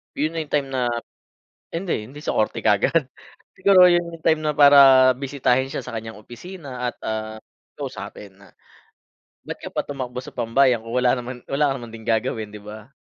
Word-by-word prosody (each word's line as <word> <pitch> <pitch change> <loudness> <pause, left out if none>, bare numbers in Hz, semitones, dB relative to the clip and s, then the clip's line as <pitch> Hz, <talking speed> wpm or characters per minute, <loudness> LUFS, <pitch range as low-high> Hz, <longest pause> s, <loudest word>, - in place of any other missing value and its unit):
yun 155 +3 -1
na 165 - -4
yung 150 - -16
time 140 -2 0
na 125 -2 0 0.9
hindi 165 - -2
hindi 145 +1 -11
sa - - -3
korte 110 - 0
kaagad, 130 +8 +2 0.5
siguro 185 -1 +6
yun 175 0 +3
na 170 - -9
yung - - -31
time 160 -1 +3
na 150 - +1
para 140 -3 +7
bisitahin 130 -1 0
siya - - -3
sa - - -8
kanyang 110 -1 -7
opisina 125 - -7
at, - - -32
ah, 110 0 -4 0.4
kausapin 95 -2 -8
na, 100 - -19 0.9
ba't - - -7
ka - - -7
pa - - -3
tumakbo 130 -3 -6
sa - - -11
pambayang 120 0 +2
kung 115 +2 -7
wala 125 -1 +3
naman 125 -1 -6
wala 145 +1 +1
ka - - 0
naman 115 -2 -10
gagawin 110 -1 -1
di 105 - -10
ba? 110 +5 -11
130 Hz, 190 wpm, -22 LUFS, 115-145 Hz, 0.9 s, para